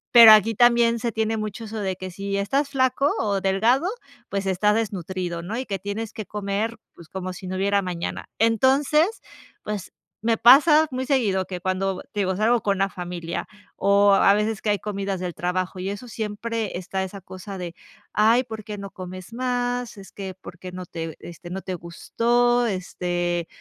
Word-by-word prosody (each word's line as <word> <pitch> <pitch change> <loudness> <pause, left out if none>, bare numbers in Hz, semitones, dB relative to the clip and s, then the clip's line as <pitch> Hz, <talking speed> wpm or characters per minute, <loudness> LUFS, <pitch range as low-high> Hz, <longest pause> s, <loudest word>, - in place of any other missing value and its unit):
pero 230 -2 +12
aquí 215 +1 +6
también 235 0 +4
se 235 0 -1
tiene 220 +1 0
mucho 215 +1 -5
eso 220 0 -6
de 190 -2 -2
que 185 0 -6
si 200 +2 -3
estás 275 +9 0
flaco 270 +1 +2
o 200 -3 0
delgado, 225 - +2 0.4
pues 200 0 -2
está 195 +3 +2
desnutrido, 185 -5 -2
¿no?, 215 +6 -4
y 260 - -3
que 195 - -3
tienes 205 +2 -4
que 215 -3 -6
comer, 210 +3 -2 0.2
pues 170 - -15
como 185 -1 -5
si 185 +1 -9
no 185 0 -3
hubiera 200 +1 +2
mañana, 175 -2 -4
entonces, 270 - +3 0.4
pues 210 -3 -5 0.3
me 225 0 +2
pasa 300 +5 +7
muy 260 +1 -2
seguido 210 -9 +1
que 180 -2 -6
cuando 185 0 -1
te 205 - 0
digo, 190 -1 0
salgo 230 +2 +3
con 200 -2 +1
la 195 - +3
familia 175 -2 -5 0.3
o 200 +1 +4
a 195 - +6
veces 210 0 0
que 215 - -1
hay 205 - 0
comidas 200 -2 -3
del 180 -2 -4
trabajo 180 +1 -2
y 190 +2 -3
eso, 205 +5 -6
siempre 220 -1 -3
está 190 +1 -3
esa 190 +1 -7
cosa 185 +2 -8
de: 175 -1 -6 0.4
"Ay, 225 +4 +4
¿por 220 -3 -8
qué 210 -1 -7
no 200 0 -6
comes 185 +3 -9
más? 245 -2 -2
Es 195 - -12
que, 190 -2 -6
¿por 180 -1 -12
qué 185 0 -8
no 180 -1 -7
te 165 -1 -6
este 175 0 -10
no 190 +1 -4
te 185 -1 -4
gustó?", 240 +8 +1
este, 175 -3 -2
200 Hz, 190 wpm, -24 LUFS, 185-230 Hz, 0.4 s, pero